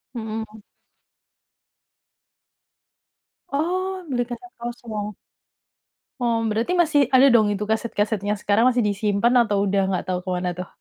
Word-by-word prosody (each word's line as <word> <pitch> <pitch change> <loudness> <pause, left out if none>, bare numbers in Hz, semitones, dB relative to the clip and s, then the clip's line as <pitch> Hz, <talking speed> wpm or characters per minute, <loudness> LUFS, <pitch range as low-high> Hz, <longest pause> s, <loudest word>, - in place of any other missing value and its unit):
Mhm. 220 -1 -6 2.9
Oh, 370 +6 -2
beli 245 -2 0
kaset 250 +10 -9
kosong. 225 -3 -5 1.1
Oh, 235 -2 +1
berarti 220 +8 -1
masih 310 -3 +2
ada 260 +1 +7
dong 225 -5 +4
itu 205 +1 -3
kaset-kasetnya 210 -2 -1
sekarang, 205 +2 +2
masih 250 - 0
disimpan 205 +3 +1
atau 205 -2 0
sudah 195 0 +2
nggak 190 -2 -1
tahu 180 -1 -1
ke 185 - -6
mana, 180 0 -1
tuh? 180 0 -6
220 Hz, 120 wpm, -23 LUFS, 205-245 Hz, 2.9 s, ada